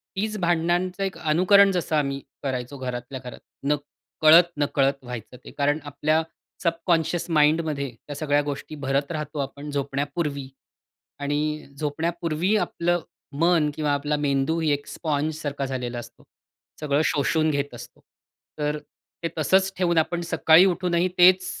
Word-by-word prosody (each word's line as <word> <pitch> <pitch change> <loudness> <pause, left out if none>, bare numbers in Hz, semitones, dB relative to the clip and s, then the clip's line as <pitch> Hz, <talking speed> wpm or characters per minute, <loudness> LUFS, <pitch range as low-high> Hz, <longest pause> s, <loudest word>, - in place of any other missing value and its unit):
तीच 215 +2 -2
भांडणांचं 175 +2 0
एक 190 -1 -3
अनुकरण 185 +5 +5
जसं 175 -4 -1
आम्ही 140 -2 0 0.2
करायचो 130 0 -3
घरातल्या 125 0 -5
घरात 125 - -9 0.3
न 150 - +4 0.5
कळत-नकळत 150 -4 +4
व्हायचं 125 -1 -8
ते. - - -9
कारण 145 +1 0
आपल्या 155 +2 +1 0.4
सबकॉन्शियस 170 0 0
माइंडमध्ये 150 -2 +2
त्या 135 +5 -10
सगळ्या 145 0 +1
गोष्टी 145 +1 -5
भरत 140 +1 -1
राहतो 150 -2 -4
आपण 140 +1 -5
झोपण्यापूर्वी 140 0 -2 0.7
आणि 150 +2 -2
झोपण्यापूर्वी 165 +5 -1
आपलं 175 -2 0 0.4
मन 165 -3 +4
किंवा 150 -2 0
आपला 145 +1 0
मेंदू 145 +2 0
ही 160 -2 +1
एक 145 0 -2
स्पॉन्जसारखा 150 -2 -2
झालेला 125 -2 -4
असतो. 120 - -12 0.6
सगळं 150 -1 +1
शोषून 155 +2 +1
घेत 145 -2 -2
असतो. 120 - -11 0.6
तर 150 0 0 0.5
ते - - +1
तसंच 190 +5 +3
ठेवून 175 -2 +1
आपण 170 +2 +1
सकाळी 165 +1 +5
उठूनही 180 -1 +1
तेच 185 +1 +6
150 Hz, 135 wpm, -24 LUFS, 140-170 Hz, 0.7 s, तेच